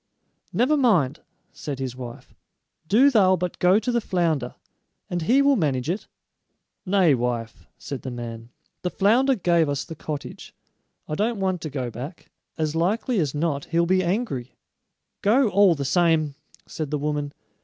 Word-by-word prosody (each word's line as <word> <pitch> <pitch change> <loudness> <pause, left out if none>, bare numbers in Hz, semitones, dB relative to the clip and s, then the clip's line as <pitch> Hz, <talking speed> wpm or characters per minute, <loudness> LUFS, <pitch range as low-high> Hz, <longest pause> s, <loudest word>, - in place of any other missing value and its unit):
"Never 260 +6 +2
mind," 180 - +2 0.3
said 145 -3 -5
his 130 -2 -4
wife; 125 -2 -9 0.5
"do 255 - +5
thou 190 -6 +5
but 180 -1 -4
go 180 +2 +5
to 245 +3 -1
the 235 -1 +1
flounder, 165 - -1 0.6
and 175 -1 -1
he 255 +12 +3
will 280 0 +4
manage 145 - 0
it." 195 - -5 0.8
"Nay, 185 -5 +4
wife," 120 -2 -3
said 140 - -6
the 130 - -5
man; 115 -2 -7 0.3
"the 180 - -1
flounder 240 +9 +3
gave 170 -6 +2
us 140 -1 -1
the 165 - -8
cottage. 150 -2 -7 0.5
I - - -4
don't 215 +6 0
want 185 -3 -1
to 155 - -4
go 130 -4 -4
back; 140 +9 -9 0.3
as 155 -1 -1
likely 210 +7 0
as 150 -4 -1
not 145 -2 -1
he'll 170 +1 +1
be 185 +1 +2
angry." 175 - -2 0.7
"Go, 230 +4 +4
all 200 -3 +5
the 140 -2 -4
same," 160 -1 +2 0.3
said 155 -3 -5
the 150 - -1
woman. 145 0 -2
165 Hz, 165 wpm, -24 LUFS, 140-200 Hz, 0.8 s, do